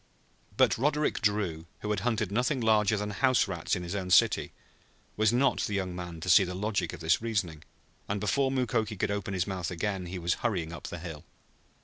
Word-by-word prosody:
But - - +4
Roderick 150 +2 +1
Drew, 100 -7 0
who 105 - -2
had 105 - 0
hunted 110 -2 -1
nothing 125 +6 +1
larger 110 -2 +3
than 105 0 -3
house 125 +4 +2
rats 90 -4 -2
in 90 - -4
his 85 +1 -5
own 95 -2 -3
city, - - +4 0.6
was 110 0 +3
not 130 +3 +2
the 105 - -1
young 95 -2 -2
man 90 -2 -6
to 95 - -6
see 100 +1 +7
the 90 0 -4
logic 105 +2 -1
of 90 - -9
this 80 +4 +2
reasoning, 100 -9 -2 0.5
and 100 +1 -1
before 130 +7 +1
Mukoki 115 -5 -1
could 95 - 0
open 100 -1 -3
his 90 -1 0
mouth 95 -3 -3
again 90 +1 -3
he 90 +2 -5
was 85 0 0
hurrying 90 -9 -1
up 80 - -7
the 85 - -6
hill. 80 -3 -8
100 Hz, 210 wpm, -29 LUFS, 90-110 Hz, 0.6 s, see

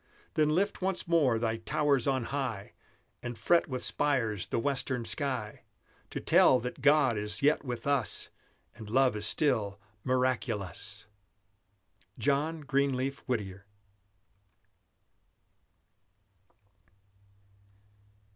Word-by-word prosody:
Then 155 -1 +2
lift 195 +7 0
once 190 -1 0
more 150 -9 +3
thy 115 0 -1
towers 140 +2 0
on 130 -2 +1
high, 125 -8 -3 0.5
And 120 -1 -6
fret 170 +7 +3
with 130 -3 -4
spires 125 -9 0
the - - -2
western 125 -1 0
sky, 130 -8 -2 0.5
To - - -5
tell 130 - +5
that 125 +2 -6
God 145 -6 +4
is 105 +3 -2
yet 150 +1 +3
with 120 -4 -5
us, 140 -5 0 0.4
And 110 -2 -11
love 130 +1 +3
is 105 0 +1
still 110 -8 +2 0.2
miraculous! 105 -6 -2 1.1
JOHN 150 +3 0
GREENLEAF 140 -1 0
WHITTIER. 100 -5 -4
130 Hz, 100 wpm, -30 LUFS, 110-145 Hz, 1.1 s, tell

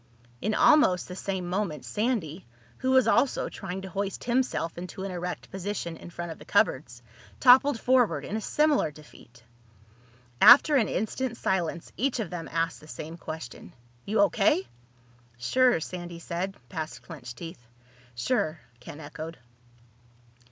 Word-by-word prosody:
In 215 +2 0
almost 190 -13 +5
the 180 - -7
same 190 -2 -3
moment 180 -4 -2
Sandy, 205 - -2 0.3
who 260 - -1
was 260 -1 +5
also 255 +2 +2
trying 190 0 -6
to 190 - -6
hoist 200 0 -3
himself 240 -9 0
into 180 +2 -7
an 195 - -4
erect 180 0 -5
position 190 -3 -4
in 165 - -11
front 175 -1 -6
of 160 - -9
the - - -11
cupboards, 120 -3 +1 0.4
toppled 260 0 +6
forward 230 - +2
in 210 - -4
a 220 - -2
similar 300 - +2
defeat. 145 -5 -17 1.0
After 285 +4 +9
an 235 -7 +3
instant's 235 +4 -2
silence 170 -3 -1
each 260 +4 0
of 220 - -3
them 170 -2 -5
asked 165 0 -1
the 155 - -15
same 155 +1 -7
question. 160 -6 -8 0.3
"You 210 0 +1
O.K.?" 165 -9 +3 0.7
"Sure," 245 - +3
Sandy 175 +1 -6
said, 175 +3 -4
past 155 +4 -6
clenched 125 -8 -9
teeth. 165 -2 -8 0.5
"Sure," 155 - 0 0.2
Ken 145 +4 -10
echoed. 160 +2 -8
180 Hz, 145 wpm, -27 LUFS, 160-225 Hz, 1.0 s, After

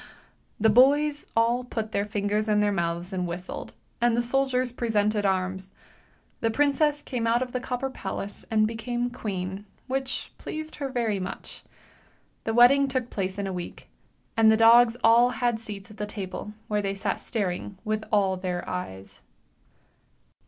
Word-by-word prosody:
" - - -40
The 220 - +7
boys 290 +5 +4
all 235 +2 +3
put 220 -3 -4
their 200 -1 0
fingers 210 +1 -1
in 210 -1 +3
their 210 0 +3
mouths 170 0 -2
and 180 -1 -1
whistled, 175 +2 -6 0.3
and 240 -1 +3
the - - +3
soldiers 255 0 +1
presented 215 -3 +1
arms. 190 0 -1 0.7
The 225 - +1
princess 290 +4 +2
came 235 -3 -2
out 235 +2 +3
of 250 - -8
the 250 - -1
copper 255 +1 -3
palace 200 -3 -6
and 215 -1 +3
became 240 +2 -3
queen, 195 -4 -4 0.2
which 265 0 -3
pleased 310 0 -6
her 280 -2 -3
very 230 -6 0
much. 185 0 -7 0.8
The 225 - 0
wedding 275 +4 +6
took 260 -2 -2
place 190 -1 -3
in 200 - -2
a 190 - -3
week, 175 -1 -7 0.5
and 225 -1 +6
the 220 - +4
dogs 230 +1 +6
all 235 +2 +6
had 240 -1 0
seats 210 -1 -8
at 210 - -14
the 210 0 -3
table, 205 +1 -6
where 210 -1 0
they 195 -1 -2
sat 195 +1 -2
staring 200 -3 -3
with 215 0 -1
all 195 -3 +2
their 180 -1 -3
eyes. 95 - -6
220 Hz, 165 wpm, -26 LUFS, 195-245 Hz, 0.8 s, The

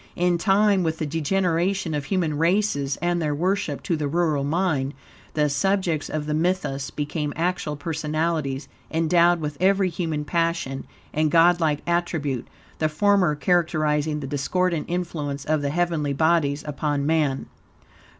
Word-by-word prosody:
In 175 -1 +1
time, 200 +1 +3
with 160 -2 -1
the 155 - -2
degeneration 175 +3 0
of 145 -2 -2
human 170 -4 0
races 165 -6 +1
and 175 0 +1
their 150 -2 0
worship, 175 -3 -1
to 170 - 0
the 150 -2 -2
rural 155 -2 +1
mind, 145 -3 0 0.4
the 150 -1 +3
subjects 170 +1 0
of 155 -1 -3
the 150 - -2
mythos 160 -4 -1
became 150 0 -3
actual 170 -2 -1
personalities, 155 -2 -2 0.2
endowed 170 +2 +3
with 150 -1 -4
every 195 0 +3
human 160 -3 -3
passion 165 -5 -1 0.3
and 155 0 +2
godlike 165 -2 +4
attribute, 160 -7 -1 0.3
the 155 - +2
former 180 0 +3
characterizing 155 -2 +1
the - - -4
discordant 160 +4 -1
influence 155 -5 -3
of 155 -1 +1
the 140 - -1
heavenly 160 -3 0
bodies 155 -1 +2
upon 145 -1 -1
man. 150 -4 +1
160 Hz, 140 wpm, -24 LUFS, 150-175 Hz, 0.4 s, godlike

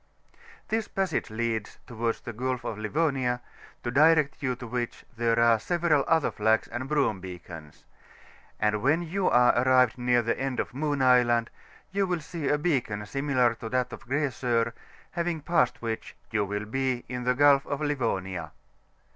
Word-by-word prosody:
This 220 0 0
passage 195 -10 -1
leads 110 -1 -3
towards 115 -2 -2
the 120 - -7
Gulf 125 +2 -2
of 105 - -4
Livonia, 130 +1 0 0.4
to 120 - -2
direct 155 +1 +4
you 130 -3 0
to 125 - -9
which, 120 0 -4
there 115 0 +1
are 115 -1 +5
several 170 -1 +1
otner 160 -2 +2
flags 110 +1 +2
and 130 +2 -5
broom 140 -10 +1
beacons; 85 -4 -10 0.7
and 105 -1 +1
when 150 +8 +2
you 185 +3 0
are 125 0 +5
arrived 125 -1 +3
near 120 -1 +2
tiie 115 - -1
end 135 -1 -2
of - - -3
Moon 145 0 -1
Island, 120 -2 +4 0.4
you 195 0 +1
will 180 -2 -1
see 160 -2 -5
a 150 - +3
beacon 125 -10 -1
similar 130 -1 +1
to 115 0 -7
that 125 +1 -1
of - - -10
Grasor, 120 -4 0 0.4
having 170 -2 -2
passed 150 -6 +1
which, 115 -1 -4 0.2
you 105 -2 +1
will 105 +1 -3
be 130 +2 -2
in 125 0 -4
the 125 +1 +2
Gulf 140 0 +5
of 145 - -2
Livonia. 95 - -2
125 Hz, 165 wpm, -27 LUFS, 115-145 Hz, 0.7 s, are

